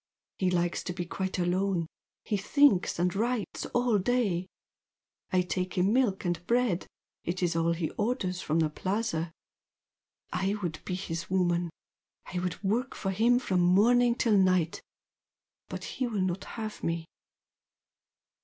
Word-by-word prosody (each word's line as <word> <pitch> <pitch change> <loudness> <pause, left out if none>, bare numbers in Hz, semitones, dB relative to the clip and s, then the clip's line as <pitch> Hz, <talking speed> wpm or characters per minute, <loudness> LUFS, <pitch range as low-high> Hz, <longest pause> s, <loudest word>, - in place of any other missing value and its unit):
He 185 - +2
likes 175 -1 0
to 180 - -2
be 175 -1 -4
quite 190 +2 -3
alone 180 0 +1 0.4
he 210 - 0
thinks 230 +1 +3
and 175 +1 +1
writes 230 +1 -1
all 245 -4 +2
day. 195 -5 +1 0.8
I 185 -1 +3
take 180 0 -3
him 190 +4 +3
milk 235 -7 +2
and 175 -1 -1
bread, 235 -7 +1 0.4
it 180 +2 -2
is 170 -1 +1
all 165 0 +2
he 165 -2 -2
orders 195 -6 -1
from 160 +2 +1
the 155 -1 +1
Plaza. 185 -2 -1 1.0
I 190 +3 0
would 160 -3 -3
be 180 - -2
his 170 -2 -4
woman. 175 -2 +1 0.6
I 180 - 0
would 180 +1 -3
work 235 +7 0
for 195 - -2
him 230 +5 +4
from 190 -7 0
morning 235 +7 +5
till 230 -3 +2
night. 185 -3 +2 0.9
But - - -5
he 260 -2 -2
will 215 -5 -1
not 185 0 -1
have 220 -2 -6
me." 165 0 -1
185 Hz, 150 wpm, -29 LUFS, 175-220 Hz, 1.0 s, morning